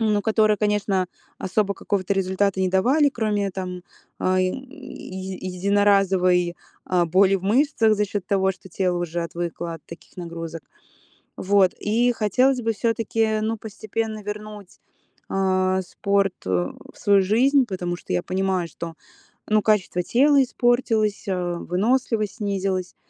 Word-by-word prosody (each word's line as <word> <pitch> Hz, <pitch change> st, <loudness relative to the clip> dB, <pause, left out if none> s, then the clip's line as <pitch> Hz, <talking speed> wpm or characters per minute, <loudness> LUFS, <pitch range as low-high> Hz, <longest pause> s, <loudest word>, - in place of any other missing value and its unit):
Ну, 210 Hz, -2 st, +1 dB
которые, 215 Hz, -1 st, +3 dB
конечно, 205 Hz, -3 st, 0 dB, 0.3 s
особо 200 Hz, +1 st, 0 dB
какого-то 200 Hz, -1 st, -1 dB
результата 190 Hz, 0 st, 0 dB
не 185 Hz, -, +2 dB
давали, 260 Hz, +11 st, +3 dB
кроме 210 Hz, -5 st, -1 dB
там, 180 Hz, -1 st, -5 dB, 0.4 s
ай, 185 Hz, 0 st, +2 dB
еди 190 Hz, -, -7 dB
единоразовой, 190 Hz, -3 st, +3 dB, 0.3 s
а, 180 Hz, -1 st, +2 dB
боли 190 Hz, +3 st, +4 dB
в 190 Hz, -, -9 dB
мышцах 225 Hz, 0 st, +3 dB
за 210 Hz, 0 st, +1 dB
счёт 200 Hz, -2 st, -4 dB
того, 190 Hz, -1 st, +2 dB
что 190 Hz, -, -15 dB
тело 180 Hz, 0 st, -1 dB
уже 175 Hz, 0 st, -2 dB
отвыкло 170 Hz, 0 st, -4 dB
от 160 Hz, -, -13 dB
таких 170 Hz, +3 st, -13 dB
нагрузок. 165 Hz, -2 st, -6 dB, 0.7 s
Вот. 195 Hz, -1 st, +3 dB
И 235 Hz, +4 st, +2 dB
хотелось 250 Hz, +5 st, +2 dB
бы 225 Hz, -, +1 dB
всё-таки, 225 Hz, -1 st, 0 dB
ну, 225 Hz, +1 st, -1 dB
постепенно 220 Hz, 0 st, -4 dB
вернуть, 210 Hz, -1 st, -8 dB, 0.5 s
э, 185 Hz, -1 st, +1 dB
спорт, 200 Hz, 0 st, 0 dB
э, -, -, -2 dB, 0.4 s
в -, -, -18 dB
свою 200 Hz, -1 st, +4 dB
жизнь, 255 Hz, +8 st, +3 dB
потому 180 Hz, -3 st, -3 dB
что 160 Hz, -, -7 dB
я 90 Hz, -, +1 dB
понимаю, 185 Hz, -2 st, -1 dB
что, 165 Hz, -1 st, -7 dB, 0.5 s
ну, 215 Hz, 0 st, +3 dB
качество 200 Hz, -4 st, +1 dB
тела 280 Hz, +7 st, +4 dB
испортилось, 240 Hz, -5 st, +1 dB
э, 180 Hz, -2 st, -1 dB
выносливость 215 Hz, +2 st, 0 dB
снизилась. 195 Hz, -3 st, -2 dB
200 Hz, 140 wpm, -23 LUFS, 185-215 Hz, 0.7 s, боли